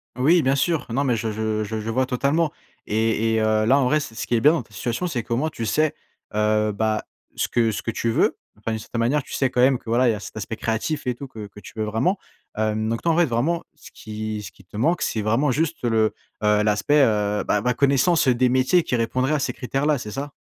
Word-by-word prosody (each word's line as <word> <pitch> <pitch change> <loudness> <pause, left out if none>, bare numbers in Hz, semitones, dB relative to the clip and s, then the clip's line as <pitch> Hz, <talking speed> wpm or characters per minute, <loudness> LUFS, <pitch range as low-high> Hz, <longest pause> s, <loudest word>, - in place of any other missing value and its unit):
Oui, 155 +7 +4
bien 135 +1 +2
sûr. 160 +1 0
Non, 135 +5 +1
mais 125 -4 +1
je 110 0 -2
je 110 0 -1
je 110 +1 -5
je - - -4
je 110 - -5
vois 130 +3 +1
totalement 140 +5 +1 0.3
et 110 +1 +1
et, 110 - +2
heu, 110 0 +2
là, 135 +5 +4
en 135 - +2
vrai, 150 +5 +3
c 140 - -6
ce 110 - -5
qui 120 - +1
est 115 - +1
bien 150 - +7
dans 165 - +1
cette - - -23
situation, 120 +9 -2
c'est 125 -9 -2
que, 115 - -3
au - - +1
moins, 155 +5 0
t - - -21
tu 115 - -3
sais, 155 +6 +1 0.4
heu, 105 0 +2
bah, 110 +1 -1 0.3
ce - - 0
que 115 -2 +1
ce - - -4
que - - -4
tu 115 +1 -1
veux. - - +2 0.2
Enfin, 115 - -4
d'une 110 - -1
certaine 115 +2 -5
manière, 135 +5 +1
tu - - -11
sais 135 - +1
quand 125 - +1
même 130 0 +4
que, - - -11
voilà, 120 +2 +3
il - - +4
y - - 0
a 105 - -4
cet 95 +1 -9
aspect 110 +1 -4
créatif 115 +7 -2
et 125 - 0
tout 140 +3 -8
que 110 -5 -8
que 100 - -14
tu 100 - -12
veux 110 - 0
vraiment. 120 - 0 0.4
Hem, 110 0 0
donc, 115 0 -1
en 165 -1 +3
fait, 175 - +5
vraiment, 145 +7 0
ce - - -15
qui 110 0 -5
ce 100 - -8
qui 95 - -20
te 95 +3 -11
manque, 165 +10 +1
c'est 110 - -1
vraiment 115 +8 +2
juste 160 +3 -1
le, 110 -2 +2 0.3
heu, 105 0 +4
l'aspect, 105 +8 +3
heu, 105 -3 +1
bah, 105 - +2
ma 125 +3 +1
connaissance 140 +5 +3
des 125 0 +3
métiers 130 +8 +3
qui 125 - -1
répondraient 130 +4 0
à 150 - +1
ces 140 - -1
critères 135 +3 -2
là, 150 -2 +3
c'est 105 -4 -7
ça? 140 +4 -5
120 Hz, 280 wpm, -23 LUFS, 110-140 Hz, 0.4 s, bien